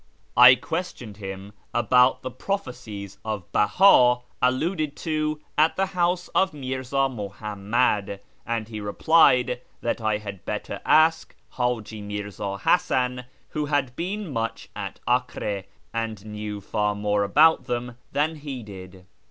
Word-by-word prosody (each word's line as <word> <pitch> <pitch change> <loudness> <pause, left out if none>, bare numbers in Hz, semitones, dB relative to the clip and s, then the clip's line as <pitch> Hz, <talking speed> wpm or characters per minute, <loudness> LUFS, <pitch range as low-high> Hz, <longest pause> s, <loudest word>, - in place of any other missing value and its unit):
I 125 +1 +10
questioned 130 - -5
him 95 0 -7 0.2
about 125 +3 +4
the 130 - -4
prophecies 110 - -5
of 110 -3 -3
Beha 125 - +5 0.2
alluded 150 +4 0
to 155 -1 -2 0.2
at 155 +1 +4
the 195 - +1
house 180 -1 0
of 190 -5 +1
Mirza 130 0 -1
Muhammad, 105 -1 -1 0.2
and 115 -2 -3
he 110 -2 -6
replied 125 +2 +3 0.2
that 120 - -2
I 110 -1 +1
had 100 -4 -8
better - - -4
ask 160 +1 +3 0.2
H;iji 115 -4 -2
Mirza 100 -1 -5
Hasan, 125 - +1 0.2
who 150 -1 -2
had 140 -4 0
been 185 0 -4
much 115 -1 -3
at 100 -2 -6
Acre, 120 -5 -1 0.3
and 115 -3 -3
knew 105 -1 -6
far 105 +1 -1
more 105 0 +1
about 150 +7 +4
them 120 -1 -3 0.2
than 155 +2 0
he 140 -5 -6
did. 95 -2 -11
120 Hz, 130 wpm, -25 LUFS, 105-145 Hz, 0.3 s, I